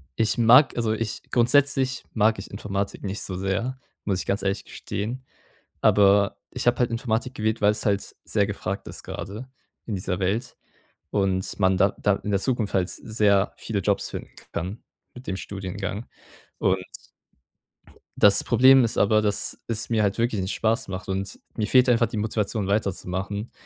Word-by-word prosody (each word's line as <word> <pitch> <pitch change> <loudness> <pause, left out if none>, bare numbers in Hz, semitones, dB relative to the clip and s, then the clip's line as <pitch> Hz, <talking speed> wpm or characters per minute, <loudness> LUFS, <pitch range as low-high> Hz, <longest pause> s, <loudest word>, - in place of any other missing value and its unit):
ich 110 0 +1
mag 125 +5 +6
also 115 -2 +1
ich 110 -1 -4
grundsätzlich 130 +1 +2
mag 110 -1 +2
ich 95 - -8
Informatik 100 0 -4
nicht 100 +1 -4
so 95 - -5
sehr, 100 +8 -2 0.3
muss 95 -3 0
ich - - -8
ganz 100 - 0
ehrlich 100 0 -1
gestehen. 120 +6 -5 0.6
Aber 100 0 +4
ich - - -4
habe 120 0 +3
halt 120 -1 +2
Informatik 115 +2 -2
gewählt, 110 +1 -1
weil 105 - +5
es 105 - -4
halt 100 -1 0
sehr 100 -2 +1
gefragt 100 -1 -4
ist - - -8
gerade 105 +8 -7 0.4
in 110 - -3
dieser 95 0 -3
Welt 110 +7 -1 0.5
und 95 -2 0
man 95 0 +4
da 100 0 +3
da 105 - +3
in 105 - -5
der 100 - +2
Zukunft 120 -3 -1
halt 95 -1 +2
sehr 105 -3 +1
viele 105 -3 -3
Jobs - - 0
finden - - -7 0.2
kann 95 +6 -4 0.3
mit 125 +1 -12
dem 95 - -2
Studiengang 100 +2 -5 0.5
und 95 0 +1 1.4
das - - +6
Problem 130 +1 +6
ist 115 - -1
aber, 110 +1 +4
dass 105 -2 0
es 115 0 -3
mir 110 -2 +3
halt 100 -1 +1
wirklich 115 -3 0
nicht 95 +2 -2
Spaß 115 +2 0
macht, 95 -1 -6
und 95 0 -4 0.2
mir 105 - -1
fehlt 130 +2 +5
einfach 120 -1 +4
die 110 +1 -6
Motivation 105 0 -1
weiterzumachen. 100 +1 -2
105 Hz, 170 wpm, -25 LUFS, 100-115 Hz, 1.4 s, mag